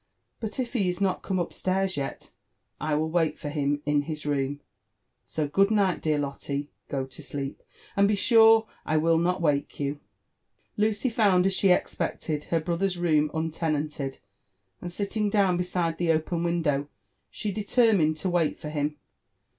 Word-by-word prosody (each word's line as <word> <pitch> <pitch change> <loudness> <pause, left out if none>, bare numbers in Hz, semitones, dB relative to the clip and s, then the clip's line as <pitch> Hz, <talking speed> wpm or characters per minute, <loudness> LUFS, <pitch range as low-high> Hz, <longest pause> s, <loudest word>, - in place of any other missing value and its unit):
*' - - -50
Bui 220 - -3
if 255 -2 -3
he 200 -7 +1
is 180 - -3
not 195 -2 0
come 190 - -2
up 175 -2 -2
stairs 190 0 0
yet, 140 -1 -5 0.5
I 155 -1 0
will 160 +1 0
wait 165 -2 +1
for 145 - -5
him 145 -1 -1
in 145 0 +2
his 150 0 -5
room. 145 -1 -1 0.7
So 155 -2 -2
good 195 +7 +3
night, 200 -4 +2
dear 155 -1 +1
Lotte 140 -1 -3
I^go 140 -1 -4
to 135 - -12
sleep^ 140 -1 -5 0.4
%nd 200 - +6
be 210 - +2
sure 225 +1 +6 0.2
I 155 - +1
will 165 +1 +3
not 180 +1 0
wake 145 -2 0
you." 145 0 -2 0.8
Lucy 215 +4 +1
found, 200 -5 +3
as 195 - +2
she 195 0 +3
expected, 155 -3 0
her 165 - +1
brother's 180 +3 -1
room 155 -3 +2
untenanted; 155 -3 -2 0.6
and 175 - -5
sitting 205 +3 -1
down 200 -3 +3
beside 175 -2 -1
the 170 -2 +2
open 160 +2 0
window, 160 -5 0 0.4
she 210 - -4
determined 205 -6 +2
to 185 +4 -1
wait 170 -3 +1
for 150 - -7
him. 150 0 -2
165 Hz, 170 wpm, -27 LUFS, 150-195 Hz, 0.8 s, nd